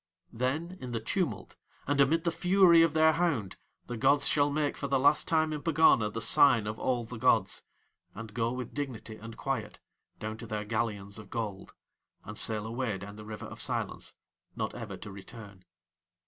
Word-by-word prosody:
Then 155 +10 -2
in 125 -2 -6
the 115 - -1
tumult 115 - -3 0.3
and 145 0 +2
amid 160 +4 +3
the 170 - +1
fury 180 0 +5
of 165 -2 +3
their 160 0 +5
hound 155 - -1 0.3
the 120 - -5
gods 140 +5 +3
shall 145 -1 +3
make 145 0 -1
for 140 - -4
the 135 0 +2
last 145 +3 +3
time 155 -1 +2
in 150 - -4
Pegana 160 -9 +4
the 115 +2 -5
sign 115 -1 +5
of 110 +1 -4
all 125 -2 0
the 115 0 -8
gods, - - +2 0.5
and 110 0 -8
go 115 0 0
with 125 -1 -6
dignity 125 -6 -5
and 115 +1 -10
quiet - - -3 0.4
down 110 +1 -5
to 115 - -9
Their 105 -1 -4
galleons 105 -2 -3
of 105 -2 -12
gold, 105 -5 -5 0.5
and - - -8
sail 110 -1 +3
away 115 -2 -2
down 100 +2 -9
the 105 0 -10
River 105 0 -7
of - - -7
Silence, - - -3 0.4
not - - -3
ever - - -7
to 105 - -9
return. 100 -1 -12
120 Hz, 190 wpm, -30 LUFS, 110-145 Hz, 0.5 s, fury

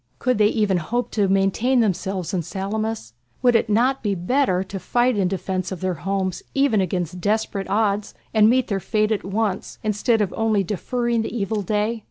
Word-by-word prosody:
Could 250 -4 0
they 210 - +6
even 210 -4 +1
hope 240 +9 -2
to 205 -3 +1
maintain 195 +7 +2
themselves 190 -3 -1
in 180 - +1
Salamis? 200 - -4 0.3
Would 245 -1 +5
it 225 - +2
not 250 +6 +2
be 205 -2 0
better 185 0 +1
to 195 +1 -6
fight 240 +6 +1
in 195 -3 +1
defence 185 0 -3
of 185 - -5
their 185 -1 -1
homes 190 +1 -2
even 275 -7 +3
against 180 -1 -2
desperate 205 -1 -1
odds 205 -1 0 0.2
and 215 -1 +6
meet 255 +1 +3
their 200 -2 -1
fate 215 +2 0
at 215 - 0
once, 200 0 -2
instead 215 +2 +1
of 200 -4 0
only 220 -3 +1
deferring 235 +5 -1
the 225 - -4
evil 210 0 -1
day? 210 +4 -1
210 Hz, 190 wpm, -22 LUFS, 190-225 Hz, 0.3 s, they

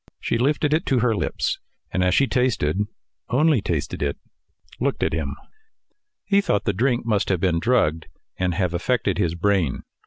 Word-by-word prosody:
She 115 - -1
lifted 145 +3 +2
it 160 - 0
to 130 -3 +2
her 115 -2 +2
lips, - - -1 0.3
and 95 - +1
as 90 0 +3
she 140 - +4
tasted 105 - +1 0.4
only 145 -1 +3
tasted 80 -6 -2
it 70 -1 -1 0.6
looked - - 0
at - - 0
him. 70 -3 -2 0.9
He 200 0 +3
thought 165 - 0
the 100 - +1
drink 120 +4 +1
must 105 -4 +1
have 95 -3 +1
been 85 -2 +1
drugged 80 -7 +1 0.3
and 90 -2 -1
have 90 -2 0
affected 100 0 0
his 85 -4 +1
brain. 90 -5 +1
100 Hz, 175 wpm, -23 LUFS, 85-125 Hz, 0.9 s, she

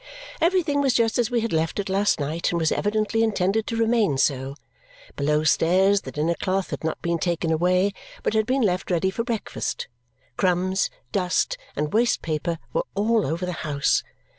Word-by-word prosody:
Everything 330 -5 +2
was 270 -3 +2
just 230 0 +2
as 240 -2 +2
we 240 -2 +1
had 230 -3 -2
left 160 0 0
it 200 - -2
last 195 0 +1
night 155 +4 -1
and 170 - 0
was 160 -1 +1
evidently 215 +2 0
intended 215 -1 +1
to 230 - -2
remain 225 - +2
so. 135 0 0 0.6
Below 150 +2 +1
stairs 190 +5 +3
the - - -8
dinner 155 +3 0
cloth 190 +2 -2
had - - -5
not 160 - -2
been 170 -1 0
taken 170 -1 -1
away, 180 +4 +2 0.3
but - - 0
had 220 -1 +1
been 260 0 +1
left 185 -3 0
ready 185 +1 +1
for 230 - -2
breakfast. 230 -2 -3 0.5
Crumbs, 185 +1 +1 0.2
dust, 190 - +1 0.2
and 150 0 -2
waste 235 +2 +2
paper 165 +1 -2 0.2
were - - 0
all 220 -1 +2
over 165 +5 -2
the 180 - -3
house. 145 -2 +1
190 Hz, 185 wpm, -24 LUFS, 165-225 Hz, 0.6 s, stairs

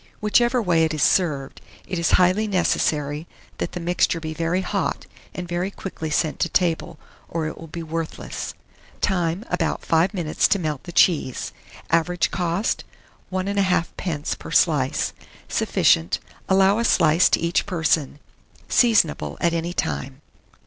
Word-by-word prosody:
Whichever 240 +3 +2
way 170 -4 +3
it 160 -1 0
is 150 - +1
served, 145 -7 +1 0.2
it 185 -2 -3
is 170 - +1
highly 185 +4 +4
necessary 155 -5 0 0.3
that - - -3
the - - -4
mixture 175 0 +1
be 160 -1 -5
very 165 +3 0
hot, - - -2 0.3
and 180 -1 -5
very 175 +2 -2
quickly 185 -5 -6
sent 155 +1 0
to 170 - +1
table, 170 -2 0 0.3
or 165 -1 -2
it 155 - -4
will 165 - -10
be 170 +2 -6
worthless. 165 0 -5 0.4
Time. 180 +1 0
About 165 -3 -1
5 165 +3 +3
minutes 165 -4 +1
to 200 - +2
melt 155 -6 -3
the 175 - -7
cheese. 160 -7 +2 0.4
Average 170 +1 +1
cost, 180 +4 -1 0.5
1 185 0 -2
1/2d. 185 -5 -1
per - - -9
slice. - - +2 0.3
Sufficient. 85 +3 +2 0.3
Allow 195 +2 +4
a - - +1
slice 165 -5 +4
to - - +2
each 170 +3 0
person. 160 -6 0 0.5
Seasonable 220 -10 +2
at 170 -1 +1
any 170 +1 -2
time. 135 -5 -3
170 Hz, 150 wpm, -23 LUFS, 160-185 Hz, 0.5 s, highly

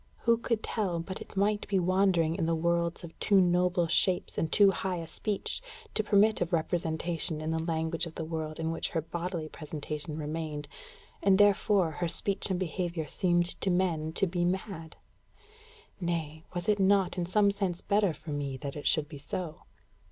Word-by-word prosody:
Who 235 0 +4
could 230 -2 -1
tell 185 -6 -1
but 185 +3 -6
it - - -10
might 205 +1 +1
be 200 - +1
wandering 185 -3 +3
in 165 -2 0
worlds 170 0 +1
of 170 - -9
too 200 -2 +4
noble 180 -1 +3
shapes 180 +2 +2
and 160 - -1
too 200 -2 +6
high 190 -1 -2
a 165 -2 -5
speech, 205 - -2 0.3
to 215 - +1
permit 210 +1 +4
of 175 0 0
representation 165 -1 -1
in 155 +1 -2
the 160 0 0
language 160 0 -1
of 160 - -11
the 160 - -4
world 160 -1 -4
in 160 0 -1
which 165 - -2
her 165 - -1
bodily 170 0 -4
presentation 155 0 -6
remained, 155 -1 -4 0.5
and 195 -1 +5
therefore 205 -3 +4
her 175 +3 -2
speech 195 +5 -1
and 185 -2 0
behaviour 175 -2 -2
seemed 175 +2 0
to 195 - 0
men 175 -4 +1
to 195 - +2
be 175 -1 -1
mad? 180 -2 -3 1.0
Nay, 165 -3 -3
was 175 +3 -3
it 210 -1 +3
not 195 -1 +3
in 175 - -1
some 200 +2 +4
sense 195 -4 -2
better 200 -2 +2
for 155 0 -8
me 140 -2 -3
that 140 +1 -6
it 145 - -3
should 155 -2 +3
be 145 -2 -9
so? 155 +2 -5
175 Hz, 185 wpm, -30 LUFS, 160-190 Hz, 1.0 s, too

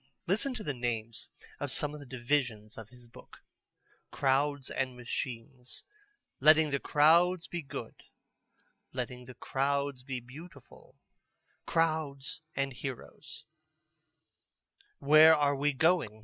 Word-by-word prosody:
Listen 215 +9 +1
to 220 - -6
the 145 - -2
names 115 -3 -4 0.3
of - - -3
some 150 0 -1
of 150 - -8
the 145 - -12
divisions 120 -4 -2
of 110 -1 -10
his 125 -1 -16
book: 120 - -15 0.7
"Crowds 140 0 0
and 130 -2 -2
Machines; 125 +1 -6 0.6
Letting 155 +1 +5
the 140 - 0
Crowds 170 +4 +4
be 175 - -5
Good; 140 - -7 1.0
Letting 125 0 -5
the 130 0 -11
Crowds 140 +1 -1
be 130 0 -5
Beautiful; 140 +2 -14 0.7
Crowds 155 -4 -1
and 135 0 -1
Heroes; 130 0 -8 1.5
Where 155 +3 +7
are 145 -1 +2
we 145 +2 +1
Going? 145 - +1
140 Hz, 120 wpm, -31 LUFS, 125-150 Hz, 1.5 s, Where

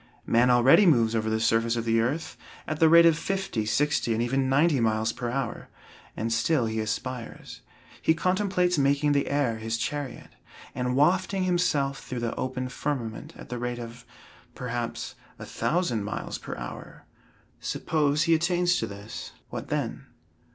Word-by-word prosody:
Man 120 +2 +3
already 125 +11 +6
moves 115 -8 +4
over 110 -1 0
the 110 0 0
surface 115 +1 +2
of 115 -1 -2
the 115 0 +3
earth 145 +8 -2 0.3
at 155 -1 -4
the 160 - +6
rate 170 +1 +8
of 165 -2 +6
fifty, 190 - -2
sixty, 145 -2 +1
and 115 - 0
even 130 +2 0
ninety 145 +1 +3
miles 110 -1 +1
per 120 - -4
hour, 125 -2 -4 0.5
and 115 +1 -1
still 125 +3 +2
he 110 0 -2
aspires. 115 +3 -5 0.4
He 160 - +3
contemplates 185 -1 +1
making 140 +1 +2
the 140 -1 +1
air 130 -6 0
his 115 +1 -2
chariot, 140 +1 -4 0.4
and 125 0 -1
wafting 185 +6 +2
himself 150 -7 0
through 125 -2 -5
the 115 -1 -2
open 130 0 -3
firmament 125 -5 -4
at - - -11
the 125 - -4
rate 120 0 -3
of, 115 0 -9 0.5
perhaps, 120 -2 -4 0.2
a - - -8
thousand 155 - -1
miles 105 - -5
per - - -7
hour. - - -9 0.5
Suppose 150 -1 0
he 165 0 +3
attains 175 +2 +2
to - - -2
this, 100 +1 -8 0.2
what - - -6
then? - - -3
130 Hz, 165 wpm, -27 LUFS, 115-160 Hz, 0.5 s, rate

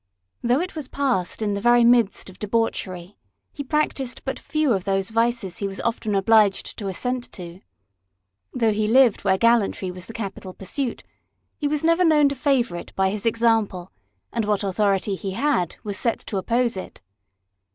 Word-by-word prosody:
Though 245 +3 +2
it 365 0 -5
was 305 -4 -5
passed 250 -9 -1
in 205 -1 0
the 200 - -3
very 240 +1 +5
midst 235 -3 +3
of 190 -1 -12
debauchery, 200 -4 -2 0.3
he 285 - -5
practised 270 -3 -1
but 265 - -3
few 305 -4 0
of 190 -3 -1
those 195 +1 -1
vices 230 -4 0
he 200 - -1
was 195 0 -7
often 220 -3 -1
obliged 205 0 +3
to 205 - -4
assent 250 +6 -2
to. 175 0 -9 0.9
Though 230 -3 +1
he 210 0 0
lived 245 -1 +4
where 190 -1 +3
gallantry 220 -4 +2
was 180 0 -9
the 225 - -9
capital 195 -4 -6
pursuit, 245 +6 -4 0.6
he 295 - 0
was 295 +1 -1
never 335 +2 +3
known 300 -4 +5
to 280 - -4
favour 255 - +1
it - - -10
by 190 0 +2
his 210 +2 -2
example, 225 -5 +1 0.4
and 230 -2 0
what 210 -1 0
authority 200 0 +1
he 195 0 -4
had 230 - 0
was 205 -2 -2
set 230 - +1
to 200 - -4
oppose 235 +4 0
it. 185 - -8
225 Hz, 180 wpm, -23 LUFS, 195-250 Hz, 0.9 s, very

